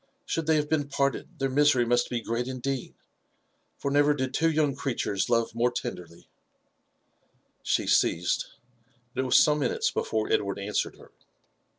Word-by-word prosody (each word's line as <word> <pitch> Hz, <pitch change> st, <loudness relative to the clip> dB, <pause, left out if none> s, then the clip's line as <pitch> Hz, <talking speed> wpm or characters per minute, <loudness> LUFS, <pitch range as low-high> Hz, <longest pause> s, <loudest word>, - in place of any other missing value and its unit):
Should 165 Hz, -2 st, -2 dB
they 160 Hz, -, +4 dB
have 150 Hz, -1 st, +1 dB
been 150 Hz, -2 st, 0 dB
parted, 140 Hz, -1 st, -2 dB
their 135 Hz, -, 0 dB
misery 135 Hz, -2 st, +3 dB
must 120 Hz, +1 st, +1 dB
be 120 Hz, -1 st, -2 dB
great 115 Hz, +2 st, -2 dB
indeed, 130 Hz, 0 st, -4 dB, 0.8 s
for 140 Hz, -, -3 dB
never 145 Hz, +1 st, +4 dB
did 130 Hz, -2 st, -3 dB
two 165 Hz, +4 st, +2 dB
young 150 Hz, -3 st, +1 dB
creatures 120 Hz, -8 st, -2 dB
love 115 Hz, -2 st, +1 dB
more 120 Hz, +1 st, +2 dB
tenderly/* 85 Hz, -7 st, -7 dB, 1.3 s
She -, -, 0 dB
ceased; 90 Hz, +1 st, +2 dB, 0.7 s
but 130 Hz, -, -1 dB
it -, -, -2 dB
was 125 Hz, -, +5 dB
some 150 Hz, 0 st, +4 dB
minutes 455 Hz, -, 0 dB
before 455 Hz, -1 st, -1 dB
Edward 430 Hz, -, 0 dB
answered -, -, -2 dB
her. -, -, -17 dB
135 Hz, 160 wpm, -27 LUFS, 120-150 Hz, 1.3 s, was